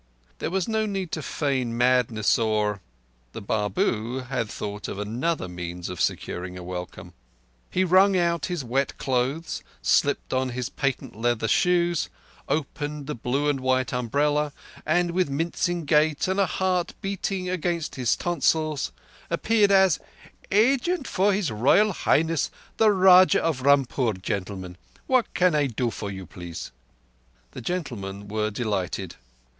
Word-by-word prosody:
There - - -2
was 185 0 -1
no 220 -1 0
need 195 -5 -3
to - - -3
feign 130 -5 -1
madness 120 -4 +3
or—the - - -3
Babu 110 - -1
had 115 -5 -1
thought 105 0 -5
of - - -5
another 115 - -2
means 90 0 -6
of 90 - -5
securing 90 +1 -2
a 90 - -8
welcome. 90 0 -7 0.6
He 185 - +1
wrung 190 +2 +5
out 170 -4 +1
his 175 -5 -3
wet 130 +3 -1
clothes, 135 +5 -1 0.2
slipped - - +2
on 130 0 +1
his 125 -2 -2
patent 140 -6 -2
leather 115 0 0
shoes, 175 +3 +2 0.4
opened 150 0 -2
the 150 - -3
blue 130 +5 -1
and 145 -2 +1
white 130 -1 0
umbrella, 145 +5 +1 0.3
and 175 +2 +2
with 180 -3 +1
mincing 170 +3 -1
gait 150 +1 +2
and 190 +1 0
a 195 - +3
heart 185 -2 -1
beating 195 -1 -2
against 175 -2 -2
his 125 -3 +1
tonsils 155 -4 0 0.4
appeared 205 +4 +3
as 190 -4 +5 0.5
"agent 270 - +2
for 200 +2 +2
His 190 - 0
Royal 140 - +4
Highness, 165 -1 +1 0.3
the 220 - +5
Rajah 185 -2 +6
of 160 -6 0
Rampur, 135 -4 +3
gentlemen. 95 -2 -4 0.3
What 255 -2 +2
can 180 -2 +4
I 145 -2 +2
do 120 -1 -1
for 100 - -5
you, 95 -1 -7
please?" 85 -2 -8 0.8
The - - -8
gentlemen 105 - -4
were 105 +1 -1
delighted. 105 -4 -3
140 Hz, 140 wpm, -25 LUFS, 110-175 Hz, 0.8 s, Rajah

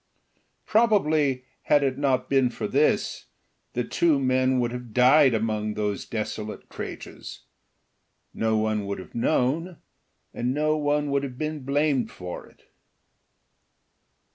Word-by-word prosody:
Probably 155 - +2 0.2
had 145 -1 +3
it 135 0 -1
not 130 -3 +1
been 135 -2 +3
for - - -4
this - - +1 0.5
the 120 - -1
two 160 +4 +2
men 130 0 +2
would 120 -1 0
have 125 -3 -8
died 130 +1 +6
among 110 -1 -1
those 105 -1 -2
desolate 105 -1 -5
craters; - - -8 0.9
no 110 -1 +1
one 110 -1 0
would 100 - -3
have 95 - -11
known, 150 +9 0 0.6
and 125 +2 -1
no 155 +1 +2
one 145 -1 0
could 140 0 +2
have 130 -3 -6
been 155 +1 -3
blamed 140 -3 +1
for 90 -1 -8
it. - - -24
130 Hz, 130 wpm, -25 LUFS, 110-145 Hz, 0.9 s, died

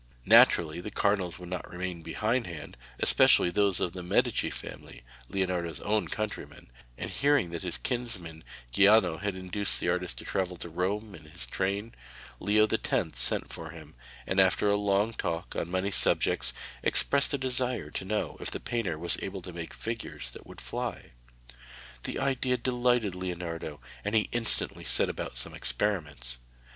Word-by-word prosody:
Naturally 80 0 +6
the 105 - -5
cardinals 100 -4 +1
would 90 -1 -9
not 90 -1 -4
remain 90 -1 -4
behindhand, 105 -3 -2 0.2
especially 85 - +5
those 100 0 +2
of 85 - -1
the 90 - -6
Medici 90 - +1
family, - - -9 0.3
Leonardo's 90 -5 -1
own 105 +1 +1
countrymen, 110 - -5 0.3
and - - -5
hearing 140 -11 +2
that 85 - -4
his 90 -2 -1
kinsman 100 -11 -4 0.3
Giuliano 100 - +5
had 100 0 -2
induced 95 +2 -2
the - - 0
artist 90 0 -1
to - - -8
travel 90 -2 -1
to 85 - -7
Rome 100 +5 -2
in 80 -4 -12
his 80 +3 -8
train, 100 +4 -2 0.5
Leo 105 +1 +4
X. - - 0
sent - - 0
for 80 - -7
him 80 -2 -11 0.3
and 95 - +1
after 95 +2 +4
a 100 - +4
long 105 +2 +2
talk 85 -4 -3
on 85 - -2
many 95 +2 0
subjects - - +2 0.3
expressed 140 +1 +3
a - - -1
desire 125 - 0
to - - -3
know 105 +3 -2
if - - -2
the - - -5
painter 105 -10 -2
was 85 +2 +1
able 95 -1 -5
to 90 - -8
make 85 -1 -6
figures 110 - -5
that - - -12
would - - -11
fly. - - -4 0.9
The - - -2
idea 130 -2 +1
delighted 120 -4 +1
Leonardo, 85 -4 -4 0.2
and 105 +2 -1
he 110 - +3
instantly 120 -1 +1
set - - +5
about 60 - -5
some 60 - -4
experiments. 70 -6 -1
95 Hz, 165 wpm, -29 LUFS, 85-110 Hz, 0.9 s, Naturally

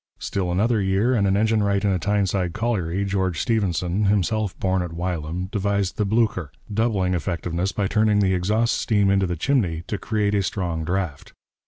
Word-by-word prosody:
Still 90 -3 -2
another 105 +4 +2
year, 95 +6 +2
and 105 -5 +2
an 95 +1 +2
engine 110 +1 +2
wright 100 0 +1
in 100 - +3
a 95 - 0
Tyneside 95 -2 0
colliery, 100 -5 -1
George 95 -3 -1
Stephenson, 100 - 0
himself 105 0 0
born 95 -1 +1
at 85 -2 -5
Wylam, 85 0 -3
devised 100 -2 -1
the 105 - 0
Blücher, 105 -7 +1 0.2
doubling 100 -4 +1
effectiveness 90 +1 -2
by 100 - -1
turning 105 +1 +2
the 95 -2 +3
exhaust 105 +6 +1
steam 100 -3 +2
into 100 -1 +2
the 85 - -2
chimney 90 - 0
to 105 - -4
create 105 -2 0
a 100 - +2
strong 90 -4 -2
draught. 85 -3 -3
100 Hz, 180 wpm, -23 LUFS, 90-105 Hz, 0.2 s, in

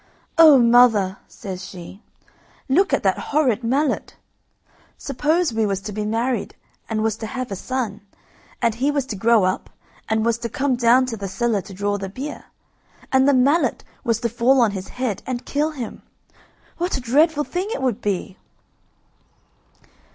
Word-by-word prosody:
"Oh, 310 -4 +9
mother!" 235 -5 +4
says 190 -2 -8
she, 185 +2 -10 0.7
"look 370 +9 +3
at - - +1
that - - +1
horrid 260 -6 0
mallet! 275 +6 0 0.8
Suppose 300 +2 0
we 220 0 +1
was 195 -1 -1
to 210 - -6
be 210 +1 -3
married, 230 +1 -1 0.3
and 215 -1 -1
was 220 -2 0
to 220 - -6
have 255 0 -5
a - - -2
son, 225 -1 -4 0.6
and 230 -1 +3
he 255 +6 0
was 285 -2 0
to 235 - -5
grow 225 +1 +3
up, 185 0 -1 0.4
and 220 0 +1
was 235 0 +1
to 235 - -4
come 265 +2 0
down 245 +2 +4
to 235 -3 -5
the 200 -1 -5
cellar 205 +2 0
to 195 - -12
draw 205 +1 -1
the 195 -1 -5
beer, 275 +9 -7 0.7
and 265 +1 +4
the - - +4
mallet 280 +6 +2 0.2
was 230 -4 0
to 235 - 0
fall 240 +4 +3
on 230 -4 +4
his 190 -1 -6
head 245 -6 -3
and 255 -1 -4
kill 295 +2 0
him, 260 -8 -7 0.8
what 350 -3 -1
a - - -4
dreadful 295 +5 +2
thing 360 +5 -3
it 280 - -3
would 245 -3 -1
be!" 195 -1 -3
235 Hz, 175 wpm, -21 LUFS, 210-270 Hz, 0.8 s, Oh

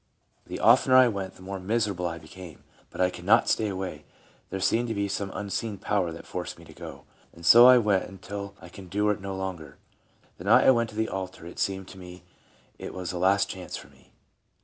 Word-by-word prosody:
The - - -6
of - - +6
tener 130 - +3
I 130 -1 +8
went, 95 -4 -4
the 95 - -15
more 95 0 -5
miserable 100 -2 -1
I 85 -1 -5
became; 85 0 -12 0.3
but - - -12
I 90 0 +3
could 90 - -10
not 100 +5 +4
stay 110 - +1
away; 95 -1 -5 0.5
there 95 - -4
seemed 115 +6 +1
to 115 - -3
be 100 0 -1
some 100 0 -3
unseen 100 +2 -3
power 95 -4 -1
that 80 - -10
forced - - -6
me - - -15
to - - -14
go, - - -10 0.3
and 85 0 -12
so 120 +8 +9
I 130 0 +9
went 105 -5 +2
until 100 +1 -8
I 90 - -12
could 95 +1 -11
endure 105 +4 0
it 100 - -3
no 95 0 -5
longer. 95 -5 -6 0.6
The - - -9
night - - +5
I - - +8
went 115 -2 +1
to 105 - -13
the 110 0 0
altar 95 -3 -6
it 85 - -10
seemed 95 -2 -2
to 95 - -12
me 90 -1 -11 0.6
it - - -7
was 90 -2 -4
a 90 - -5
last 95 +2 +3
chance 95 -1 -7
for - - -12
me. - - -24
95 Hz, 235 wpm, -27 LUFS, 90-105 Hz, 0.6 s, so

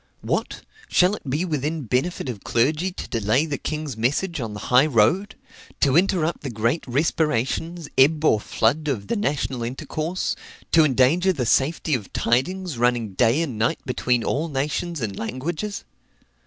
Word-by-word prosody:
What! - - -2 0.3
shall 180 +2 +3
it 145 - -9
be 150 +7 0
within 155 -1 -2
benefit 130 +8 -1
of 115 -6 -6
clergy 150 +10 +1
to - - -7
delay 115 +6 +1
the 145 -3 -3
king's 155 -4 -4
message 145 +8 -1
on 110 -3 -5
the - - -6
high 130 +5 +7
road? 150 - +2 0.4
to 135 -1 +3
interrupt 175 -2 +2
the 140 - -4
great 115 +7 0
respirations, 150 +3 0
ebb 150 +3 +4
or 110 - +4
flood, 130 +8 0
of 115 -9 -2
the - - +1
national 145 - -1
intercourse 155 +8 -3 0.4
to 165 - +6
endanger 150 +7 +3
the 135 -9 -2
safety 150 +6 +1
of 115 -7 -2
tidings, 145 +5 0
running 120 -4 +1
day 120 - +3
and 125 -9 -5
night 115 - +1
between 125 -2 0
all 155 +4 -1
nations 150 +3 -2
and 100 -4 -3
languages? 155 - -4
140 Hz, 160 wpm, -23 LUFS, 120-165 Hz, 0.4 s, high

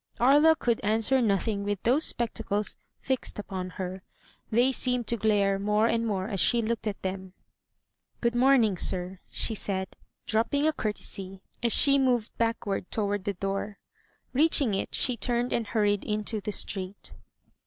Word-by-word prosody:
'* - - -28
Aria 295 +6 +5
could 235 -6 -1
answer 225 +5 +2
nothing 200 -1 0
with 205 -1 -3
those 270 +7 +3
spectacles 210 -3 -2 0.3
fixed 260 -1 -2
upon 190 -3 -5
her. 185 0 -5 0.5
They 240 +4 +3
seemed 250 -2 +1
to 235 - +3
glare 200 -3 +1
more 210 +2 +1
and 230 0 0
more 190 -2 -2
as 200 -4 -1
she 240 - +5
looked 225 0 -2
at 205 - -3
them. 190 -1 -5 0.4
*' - - -47
Good 235 -1 0
morning, 240 -5 +3
sir,'' 180 +1 -1
she 225 - -1
said, 190 -2 -3 0.3
dropping 230 +7 0
a 315 - +2
courtesy 195 -5 -4 0.2
as 235 -1 +2
she 280 +3 +7
moved 245 -4 0
backward 225 -5 -2
toward 205 -2 -2
the 200 - -1
door. 195 +2 -4 0.6
Reaching 280 -4 +4
it, 195 - -3
she 250 - 0
turned 240 +1 0
and 230 -2 -1
hurried 205 -2 0
into 210 0 -2
the 210 - -4
street. 195 -1 -4
215 Hz, 165 wpm, -27 LUFS, 195-240 Hz, 0.6 s, she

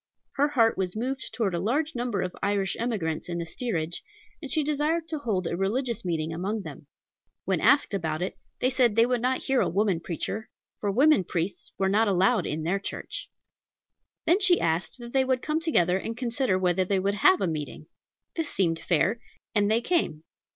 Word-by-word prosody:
Her 285 +1 +2
heart 230 -8 +2
was 185 0 -1
moved 255 +4 -3
toward 210 -6 -1
a 170 - 0
large 285 - 0
number 240 -5 -1
of 180 - -4
Irish 200 -1 0
emigrants 190 -10 -2
in 170 - -2
the 170 - -3
steerage, 170 -4 -3 0.4
and 285 - -6
she 310 +1 +1
desired 305 +3 0
to 310 - -3
hold 205 -9 -1
a 170 - -1
religious 230 +5 -1
meeting 165 -3 -2
among 195 +5 -2
them. - - -10 0.6
When - - 0
asked 280 -6 +4
about 165 -3 -1
it, 185 - -3 0.3
they 255 - +3
said 245 -4 +3
they 230 +1 +6
would 245 -1 0
not 255 +1 0
hear 270 -1 +2
a - - +1
woman 195 -2 +1
preacher, 180 +6 -4 0.3
for 205 - -1
women 275 +1 +5
priests 175 +2 -3
were 190 - +1
not 215 +3 +3
allowed 195 +1 +3
in 155 +1 -3
their 185 +5 0
church. 200 - -6 1.0
Then 350 +5 +4
she 365 -4 +5
asked 165 +3 -1
that 240 -1 -10
they 265 -1 +4
would 260 -1 0
come 310 +1 0
together 190 - +2
and 225 +3 -5
consider 240 -4 0
whether 185 0 +2
they 195 +1 0
would 200 +2 0
have 375 - +5
a - - +1
meeting. 155 -2 -4 0.5
This 325 -3 -2
seemed 165 -4 0
fair, 185 +7 +1 0.3
and 205 -1 +2
they 225 +2 +3
came. 240 - 0
210 Hz, 200 wpm, -27 LUFS, 180-255 Hz, 1.0 s, they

